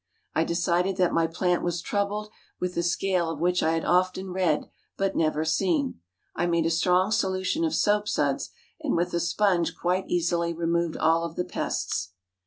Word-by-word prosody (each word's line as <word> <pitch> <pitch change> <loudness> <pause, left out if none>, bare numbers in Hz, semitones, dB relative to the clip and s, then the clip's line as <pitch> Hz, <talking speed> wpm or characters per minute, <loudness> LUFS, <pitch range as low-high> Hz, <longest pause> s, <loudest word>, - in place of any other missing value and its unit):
I 160 - +2
decided 175 +3 0
that 180 -2 +2
my 165 -1 +3
plant 180 +2 0
was 175 0 -1
troubled 205 +3 -2 0.3
with 180 0 -2
the 170 - 0
scale 175 0 0
of 160 -3 -4
which 180 +2 +2
I 160 - +2
had 165 - -1
often 185 +1 +1
read, 180 -5 +1 0.3
but 195 0 0
never 155 -1 +1
seen. 160 - 0 0.4
I 175 - 0
made 170 -1 +2
a - - +1
pretty 165 - +1
strong 180 +4 +2
solution 190 - 0
of 320 - +1
soap 210 0 +2
suds, - - 0 0.3
and 305 -4 -1
with 175 +1 0
a 170 - +1
sponge 170 -2 +1
quite 180 +2 -1
easily 170 -1 0
removed 170 0 -1
all 165 +1 +3
of 170 -1 -5
the 180 - -1
pests. 95 - -3
175 Hz, 190 wpm, -26 LUFS, 165-190 Hz, 0.4 s, my